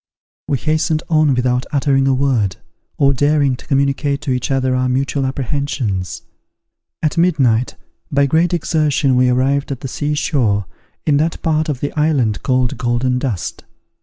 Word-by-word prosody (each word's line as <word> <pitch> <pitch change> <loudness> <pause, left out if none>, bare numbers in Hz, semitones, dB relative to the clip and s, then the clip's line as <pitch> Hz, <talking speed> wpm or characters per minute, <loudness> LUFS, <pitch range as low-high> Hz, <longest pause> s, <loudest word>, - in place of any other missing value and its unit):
We 140 - 0
hastened 155 +2 0
on 155 -4 +3
without 125 0 0
uttering 135 -2 +2
a 135 - +3
word, 125 -8 +1 0.4
or 140 -1 +3
daring 145 0 +2
to - - -15
communicate 140 0 +1
to 140 - -3
each 125 -1 -1
other 130 -1 +1
our 130 0 0
mutual 135 +1 0
apprehensions. 120 - -3 0.8
At 155 +1 0
midnight, 130 -9 +2 0.4
by 140 -1 +3
great 160 +5 +2
exertion, 150 -5 +1
we 125 0 +3
arrived 135 +3 +1
at 135 - -5
the - - -4
sea 145 +3 -2
shore, 115 - 0 0.4
in 145 -2 +3
that 160 +3 0
part 155 -1 +1
of 135 -4 -3
the 145 - -2
island 145 -9 +1
called 130 -3 0
Golden 125 +1 0
Dust. 120 -9 -4
135 Hz, 160 wpm, -18 LUFS, 125-150 Hz, 0.8 s, on